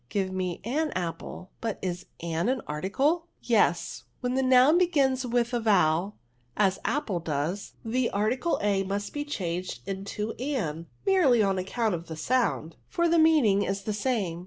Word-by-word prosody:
Give 195 -2 -1
me 185 -2 -3
an 300 +8 0
apple; 180 +1 -5
but 225 -3 -2
is 180 0 -3
an 170 +4 -1
an 260 -2 0
article? 195 - 0
^' - - -25 0.2
Yes; - - +1
when 250 0 -2
the 265 - +2
noun 260 +5 +6
begins 270 -7 +2
with 240 0 0
a 240 - +2
vowel, 195 -3 +2 0.4
as 195 -3 +2
apple 230 -8 -1
does, 165 +5 -3
the 235 +2 +1
article 230 +11 0
a 200 -2 +2
must 200 +1 -3
be 290 - -2
changed 180 - -4
into 200 +3 -4
an, 170 - -2 0.2
merely 315 - +4
on 195 -1 +1
account 215 +3 -1
of 170 -1 -5
the 160 - -7
sound; 165 - 0
for 340 0 +1
the 335 0 +4
meaning 295 -12 +5
is 195 0 -2
the 215 - -2
same. 205 -6 -1
210 Hz, 170 wpm, -27 LUFS, 185-255 Hz, 0.4 s, noun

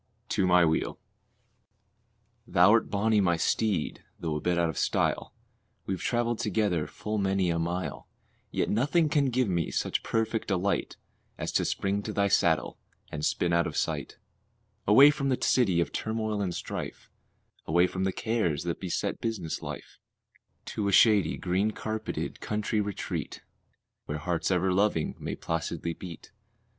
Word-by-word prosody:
TO 95 - +1
MY 90 -1 +6
WHEEL. 80 0 0 1.5
Thou'rt 105 +5 +5
bonnie, 105 +1 +2
my 85 -3 +2
steed, 100 -1 0 0.2
though 80 -2 -2
a - - -1
bit 90 -1 +1
out 85 -1 +2
of 80 - -4
style, - - 0 0.5
We've 95 -2 -3
traveled 120 -1 0
together 100 -6 0
full 105 0 -4
many 95 -2 +1
a 85 - 0
mile; 85 -2 -3 0.4
Yet - - -1
nothing 150 +8 +2
can 145 -2 +2
give 125 -1 +1
me 85 -4 0
such - - -1
perfect 110 0 -1
delight 95 0 -1 0.4
As - - -3
to - - +1
spring 100 +1 -1
to 105 +1 -5
thy 100 -1 +2
saddle - - +2 0.3
and 75 0 -5
spin 85 +2 +1
out 85 0 +3
of - - -5
sight, - - -2 0.7
Away 135 +8 +8
from 140 -2 -2
the 130 - +2
city 100 -9 +3
of 85 -4 0
turmoil 110 -1 -2
and 90 -3 -2
strife, - - -6 0.6
Away 85 +3 +4
from 95 +1 -3
the 95 - +1
cares 100 -10 -1
that 85 -1 -3
beset 90 -3 -2
business 100 -8 -3
life, - - -8 0.7
To 105 - -1
a - - +1
shady, 100 -5 +5
green 95 +4 0
carpeted 110 0 -4
country 105 0 -1
retreat, 100 -2 -4 0.6
Where 75 - -3
hearts 85 +2 -1
ever 95 0 +2
loving 95 -5 +1
may - - -4
placidly 80 0 -3
beat. 85 -1 -10
95 Hz, 155 wpm, -28 LUFS, 85-110 Hz, 1.5 s, Away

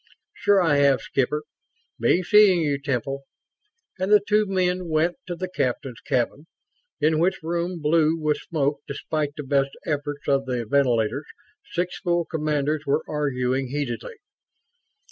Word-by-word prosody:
"Sure 205 -1 +3
I 165 -5 +3
have, 140 -2 +4
Skipper. 145 +3 -1 0.6
Be 145 +10 +3
seeing 210 -3 +6
you, 145 -2 0
Temple," 135 0 -2 0.8
and 190 +2 -1
the 210 - +8
two 210 +1 +1
men 185 -1 0
went 160 +2 +1
to 175 - -3
the 185 +2 -4
captain's 130 -7 -3
cabin; 130 +5 -1 0.5
in 155 +1 +2
which 180 0 +1
room, 170 +2 -2
blue 160 +1 +3
with 150 -1 +1
smoke 145 -3 -1
despite 145 +1 -3
the 150 - -4
best 135 0 0
efforts 145 -1 -3
of 135 -1 +1
the 125 -2 -2
ventilators, 125 +1 +1 0.5
six 180 +1 -2
full 175 -2 0
commanders 150 -1 -1
were 145 +3 +1
arguing 135 -3 -1
heatedly. 140 - -4
150 Hz, 145 wpm, -24 LUFS, 140-175 Hz, 0.8 s, the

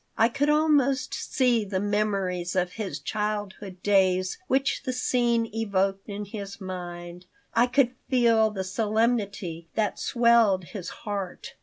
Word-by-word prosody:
I 230 - +4
could 280 +4 0
almost 295 -3 +2
see 245 -4 +1
the 190 -2 -2
memories 195 -4 -1
of 180 -1 +1
his 195 -8 -4
childhood 205 +2 -4
days 185 -2 +2
which 270 -2 +1
the 260 -2 -3
scene 240 -2 +1
evoked 195 -2 -1
in 205 0 -5
his 200 -1 -7
mind. 175 -2 -7 0.3
I 240 +2 +4
could 255 0 +2 0.2
feel 230 -4 +4
the 195 -3 -4
solemnity 205 -4 -1
that 215 -2 0
swelled 235 -6 +3
his 180 0 -7
heart. 200 -3 -6
205 Hz, 135 wpm, -26 LUFS, 185-235 Hz, 0.3 s, I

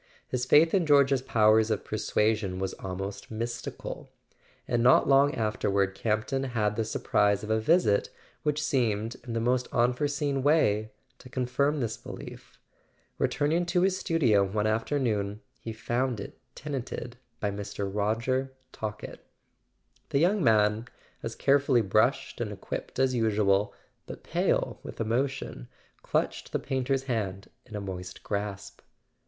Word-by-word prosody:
His 125 -1 -2
faith 160 +4 +6
in 185 -5 +2
George's 140 -2 +5
powers 110 -3 +4
of 110 - -1
persuasion 105 -2 0
was 95 0 -2
almost 95 +1 -6
mystical. 120 +2 -5 0.6
And 120 - +1
not 125 +2 +5
long 140 +1 +5
afterward 100 -3 0
Campton 110 +6 -1
had 110 -5 0
the 115 - 0
surprise 105 -1 +1
of 105 - -3
a 110 - +3
visit 110 - +3 0.3
which 150 0 0
seemed, 115 -6 0
in 115 - -4
the 115 - 0
most 125 +2 +1
unforeseen 140 +3 +1
way, 110 -8 +3 0.3
to 125 - -13
confirm 130 +4 0
this 115 -2 -2
belief. - - -10 0.6
Returning 160 +4 +1
to 175 +1 +2
his 190 0 +3
studio 140 - +3
one 105 +2 -1
after¬ 115 +7 0
noon 105 -5 -1 0.2
he 115 - -6
found 120 +1 -1
it 100 - -8 0.2
tenanted 130 -3 -5 0.2
by 105 - -1
Mr. 100 0 -4
Roger 115 +7 0 0.2
Talkett. 110 -1 -6 0.9
The - - +1
young 180 +5 +3
man, 110 0 +3 0.3
as - - -5
carefully 140 -3 +3
brushed 110 +6 +1
and 110 -3 -2
equipped 100 - -6
as 130 0 +2
usual, 105 -3 +2 0.4
but - - -9
pale - - 0
with - - -9
emotion, 120 - -2 0.3
clutched - - -1
the - - +2
painter's 135 0 -1
hand 100 -7 -3 0.2
in 110 - -9
a - - -2
moist 90 -2 -7
grasp. 100 -1 -4
115 Hz, 140 wpm, -28 LUFS, 105-135 Hz, 0.9 s, faith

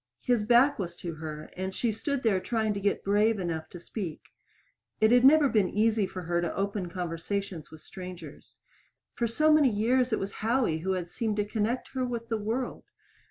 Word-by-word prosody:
His 240 -4 +2
back 245 +4 +5
was 175 -3 -4
to 170 -1 -6
her, 155 -1 -7
and 190 +1 -4
she 235 - 0
stood 265 +5 -3
there 210 -5 +3
trying 220 +1 -1
to 200 - -3
get 200 0 0
brave 210 +2 +3
enough 165 -4 -3
to 175 - -10
speak. 175 -3 -6 0.7
It 220 +1 +4
had 245 0 +5
never 290 +2 +7
been 210 -7 +2
easy 215 -1 +2
for 185 -1 -7
her 170 +1 0
to 170 - -2
open 200 -2 -2
conversations 175 0 -4
with 160 - -13
strangers. 180 -5 -10 0.6
For 235 - -1
so 305 +7 +3
many 300 -3 +5
years 245 +4 +1
it 220 - +2
was 195 +1 -3
Howie 225 -7 +1
who 190 +4 -1
had 180 -2 -3
seemed 215 +4 -2
to 205 -1 0
connect 220 +3 -2
her 260 -1 -2
with 235 -2 -4
the 225 - 0
world. 230 +5 -3
210 Hz, 200 wpm, -28 LUFS, 180-235 Hz, 0.7 s, never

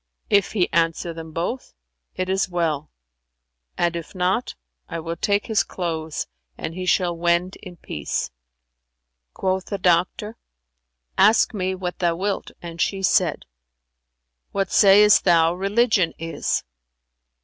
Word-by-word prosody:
If 200 0 +3
he 190 -5 +2
answer 165 0 +1
them 160 -1 -9
both, 175 +11 -4 0.4
it 185 0 -2
is 190 0 0
well; 160 -4 -1 0.9
and 170 0 +1
if 170 +3 -7
not, 185 +7 0 0.3
I - - -4
will 165 +1 -4
take 200 +4 0
his 220 -2 +2
clothes 160 -3 -4 0.3
and 160 - -5
he 185 +1 -5
shall 180 -2 +2
wend 175 +2 +1
in 180 -1 -11
peace." 75 - -4 1.0
Quoth 190 0 -1
the 200 - -4
doctor, 185 +4 +1 0.8
"Ask 215 +4 +5
me 190 -2 -1
what 180 -1 -5
thou 170 -2 +1
wilt," 195 +3 -2
and 170 0 -6
she 195 -1 -1
said, 180 -4 +2 1.1
"What 195 -1 -1
sayest 205 +1 +6
thou 165 -2 +4
religion 200 -1 +2
is?" 165 0 -2
180 Hz, 130 wpm, -23 LUFS, 170-195 Hz, 1.1 s, sayest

